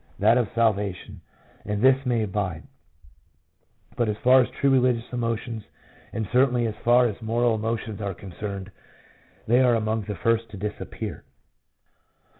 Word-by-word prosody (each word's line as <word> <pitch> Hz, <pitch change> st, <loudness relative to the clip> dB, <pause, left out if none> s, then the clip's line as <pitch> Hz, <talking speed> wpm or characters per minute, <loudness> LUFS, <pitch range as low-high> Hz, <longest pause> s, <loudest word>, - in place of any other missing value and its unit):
that -, -, +4 dB
of 120 Hz, -4 st, +1 dB
salvation, 100 Hz, -4 st, -1 dB, 0.4 s
and 105 Hz, 0 st, -2 dB
this 135 Hz, 0 st, +4 dB
may 120 Hz, -3 st, +1 dB
abide; 95 Hz, -5 st, -3 dB, 1.3 s
but 120 Hz, -2 st, 0 dB
as 105 Hz, -, -2 dB
far 130 Hz, +1 st, +7 dB
as 125 Hz, -, -1 dB
true 140 Hz, -, +1 dB
religious 125 Hz, -3 st, +2 dB
emotions, 115 Hz, -1 st, -2 dB, 0.5 s
and 110 Hz, -2 st, -3 dB
certainly 125 Hz, -2 st, +3 dB
as 110 Hz, -, -2 dB
far 120 Hz, +1 st, +5 dB
as 110 Hz, -1 st, -3 dB
moral 115 Hz, +1 st, +1 dB
emotions 110 Hz, -1 st, -3 dB
are 100 Hz, -2 st, -3 dB
concerned, 100 Hz, +1 st, -7 dB, 0.8 s
they 120 Hz, +3 st, +4 dB
are 125 Hz, -2 st, +4 dB
among 110 Hz, 0 st, 0 dB
the 105 Hz, -, -4 dB
first 115 Hz, +4 st, 0 dB
to 105 Hz, -, -9 dB
disappear. 105 Hz, +2 st, -6 dB
115 Hz, 145 wpm, -25 LUFS, 105-120 Hz, 1.3 s, far